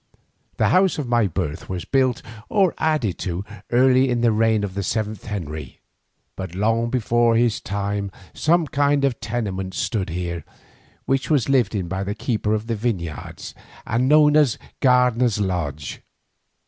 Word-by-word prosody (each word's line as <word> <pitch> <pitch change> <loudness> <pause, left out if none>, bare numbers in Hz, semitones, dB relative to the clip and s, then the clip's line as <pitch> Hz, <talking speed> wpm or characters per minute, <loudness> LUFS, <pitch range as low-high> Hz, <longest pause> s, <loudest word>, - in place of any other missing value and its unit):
The - - +3
house 185 -1 +3
of 145 -4 -3
my 120 -3 +3
birth 80 -4 -4
was 90 -2 -4
built 130 -3 +1 0.3
or 195 -4 +3
added 155 - 0
to 90 +1 -3 0.3
early 130 +1 +4
in 120 -1 0
the 120 -1 +4
reign 110 -1 +2
of 100 -2 -3
the 100 - -2
seventh 110 +1 -3
Henry, 80 - -6 0.6
but 95 -2 -6
long 115 +4 +1
before 120 -1 +2
his 115 -2 +2
time 100 0 -2 0.2
some 170 +1 +2
kind 145 -1 +2
of 130 -3 -1
tenement 95 -5 -3
stood 100 -6 -1
here, 85 -1 -4 0.6
which 135 0 0
was 140 -5 +2
lived 125 -6 +2
in 95 -4 -2
by 95 +2 -3
the 100 +1 -3
keeper 110 -2 -1
of 110 0 -3
the 115 0 -2
vineyards, 95 - -4 0.3
and 120 +2 +1
known 150 0 +6
as 145 -6 +4 0.2
Gardener's 125 -3 +3
Lodge. 80 -8 -3
115 Hz, 160 wpm, -22 LUFS, 95-130 Hz, 0.6 s, known